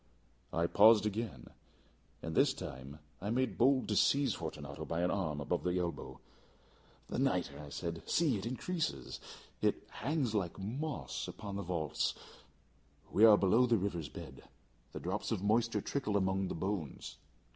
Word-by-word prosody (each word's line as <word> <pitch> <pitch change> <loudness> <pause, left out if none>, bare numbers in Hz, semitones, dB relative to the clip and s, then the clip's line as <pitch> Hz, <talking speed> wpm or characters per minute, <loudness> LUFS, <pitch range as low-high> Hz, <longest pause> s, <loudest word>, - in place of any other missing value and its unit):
I 85 +1 +1
paused 105 +4 +6
again, 105 - -3 0.7
and 80 - -3
this - - +4
time 65 +3 -7 0.2
I 100 - -3
made 130 +3 0
bold 130 +2 +4
to - - +1
seize 140 -5 +4
Fortunato 75 -3 -6
by 85 +2 -2
an 90 - +2
arm 80 -7 -1
above 85 +5 -1
the 90 0 0
elbow. 85 -1 -3 0.9
"The - - -3
nitre!" 70 - 0
I 75 -1 -8
said; 85 +3 -4
"see, 160 -7 +3
it 100 +2 -3
increases. 130 - -3 0.4
It - - +1
hangs 135 -3 -1
like 95 -6 -1
moss 130 +10 -4
upon 100 -2 -6
the 100 - -2
vaults. 85 -5 -1 1.0
We 110 - +6
are 105 -2 +9
below 110 +7 +4
the 115 -1 +4
river's 85 -6 -2
bed. - - -9 0.5
The - - -6
drops - - -3
of 95 - -1
moisture 115 +3 +2
trickle 110 -8 -1
among 95 0 +1
the - - -4
bones. 95 -3 -4
100 Hz, 155 wpm, -34 LUFS, 85-115 Hz, 1.0 s, are